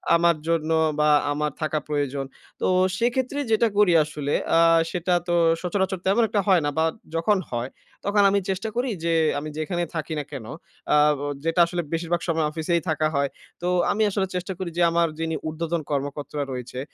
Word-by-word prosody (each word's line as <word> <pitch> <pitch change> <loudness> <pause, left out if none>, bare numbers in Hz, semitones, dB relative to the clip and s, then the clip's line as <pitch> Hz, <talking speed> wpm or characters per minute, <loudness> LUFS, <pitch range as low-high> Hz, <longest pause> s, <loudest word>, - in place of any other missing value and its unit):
আমার 170 0 +4
জন্য 165 -1 0 0.3
বা 150 0 +4 0.2
আমার 150 0 -1
থাকা 155 0 0
প্রয়োজন। 145 -2 -2 0.4
তো - - +1 0.3
সেক্ষেত্রে 255 +5 0
যেটা 225 +1 +4
করি 205 -4 +5
আসলে, 150 -1 -4 0.2
আ - - +6 0.3
সেটা 180 0 0
তো 175 - 0 0.3
সচরাচর 190 +1 -1
তেমন 200 +5 +3
একটা 210 -1 +1
হয় 185 -4 +5
না - - +2
বা 160 - +3 0.3
যখন 195 +5 +2
হয়, 120 +1 -2 0.4
তখন 205 0 +3
আমি 200 - +2
চেষ্টা 195 +3 -2
করি 250 +2 0
যে, 170 - +1 0.3
আমি 155 +1 -6
যেখানেই 175 +2 -2
থাকি 160 0 -3
না 145 - -3
কেন? 130 -6 -7 0.5
আ - - +6 0.3
ও - - -2 0.2
যেটা 165 +1 +1
আসলে 175 0 -2
বেশিরভাগ 170 +1 -1
সময় 160 -2 +1
অফিসেই 165 +1 0
থাকা 155 0 +1
হয়। 140 -1 +1 0.3
তো 175 - -2 0.2
আমি 215 +2 -1
আসলে 195 -1 -1
চেষ্টা 180 +2 -3
করি 185 - -3
যে, 175 - +2
আমার 170 0 +3
যিনি 160 0 -1
উর্ধ্বতন 165 +1 -2
কর্মকর্তা 145 +1 -3
রয়েছে, 125 0 -6
165 Hz, 185 wpm, -24 LUFS, 150-190 Hz, 0.5 s, আ